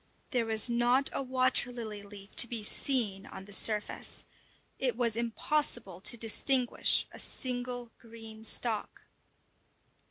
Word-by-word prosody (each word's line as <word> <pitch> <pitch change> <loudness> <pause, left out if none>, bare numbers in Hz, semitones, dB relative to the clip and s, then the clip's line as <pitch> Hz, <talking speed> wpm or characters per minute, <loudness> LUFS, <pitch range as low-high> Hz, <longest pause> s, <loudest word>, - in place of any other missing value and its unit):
There 240 -4 0
was 220 0 +4
not 240 +3 +2
a - - -2
water 255 -1 +2
lily 220 -4 -7
leaf 200 0 -13
to 240 - +6
be 230 -2 -5
seen 210 -4 -2
on 190 - -9
the 205 - -6
surface; 210 0 0 0.5
it 250 -3 -1
was 235 -3 0
impossible 235 - 0
to 235 - +2
distinguish 245 +3 +3
a - - -12
single 245 -2 -3
green 225 -1 -12
stalk. 225 -1 0
235 Hz, 130 wpm, -30 LUFS, 215-250 Hz, 0.5 s, to